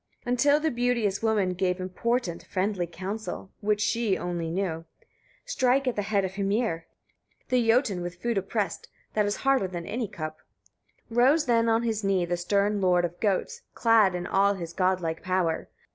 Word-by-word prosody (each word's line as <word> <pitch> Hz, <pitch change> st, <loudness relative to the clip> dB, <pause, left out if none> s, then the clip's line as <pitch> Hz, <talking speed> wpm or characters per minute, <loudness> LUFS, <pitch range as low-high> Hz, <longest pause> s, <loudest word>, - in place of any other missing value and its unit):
30. 245 Hz, -, -3 dB
Until 285 Hz, +4 st, +4 dB
the 315 Hz, 0 st, 0 dB
beauteous 235 Hz, -5 st, 0 dB
woman 210 Hz, -5 st, +1 dB
gave 180 Hz, 0 st, 0 dB
important, 185 Hz, 0 st, -2 dB
friendly 190 Hz, -2 st, -1 dB
counsel, 190 Hz, +3 st, -6 dB
which 210 Hz, 0 st, 0 dB
she 225 Hz, -3 st, +1 dB
only 175 Hz, -2 st, -3 dB
knew: 165 Hz, -2 st, -2 dB, 0.6 s
"Strike 270 Hz, -, +1 dB
at 250 Hz, -, +1 dB
the 205 Hz, -, 0 dB
head 200 Hz, -1 st, 0 dB
of 190 Hz, -, -5 dB
Hymir, 200 Hz, -4 st, -1 dB, 0.6 s
the 250 Hz, -2 st, +2 dB
Jotun 225 Hz, -6 st, +2 dB
with 175 Hz, 0 st, -6 dB
food 235 Hz, +2 st, -1 dB
oppressed, 195 Hz, +1 st, -2 dB, 0.3 s
that 210 Hz, -1 st, +2 dB
is 205 Hz, -, 0 dB
harder 270 Hz, -7 st, +2 dB
than 175 Hz, -2 st, -6 dB
any 230 Hz, +3 st, -3 dB
cup." 155 Hz, -3 st, -6 dB, 0.7 s
31. 240 Hz, +1 st, +3 dB
Rose 305 Hz, +3 st, +3 dB
then 230 Hz, -1 st, +3 dB
on 225 Hz, +1 st, +2 dB
his 220 Hz, -2 st, -1 dB
knee 195 Hz, -3 st, +2 dB
the 175 Hz, +1 st, -1 dB
stern 200 Hz, +3 st, +1 dB
lord 180 Hz, -1 st, +3 dB
of 175 Hz, 0 st, -6 dB
goats, 220 Hz, -, -1 dB
clad 220 Hz, -5 st, +4 dB
in 175 Hz, 0 st, -3 dB
all 200 Hz, +2 st, +3 dB
his 170 Hz, -3 st, -6 dB
godlike 185 Hz, -3 st, 0 dB
power. 185 Hz, -3 st, -1 dB
200 Hz, 175 wpm, -27 LUFS, 180-230 Hz, 0.7 s, Until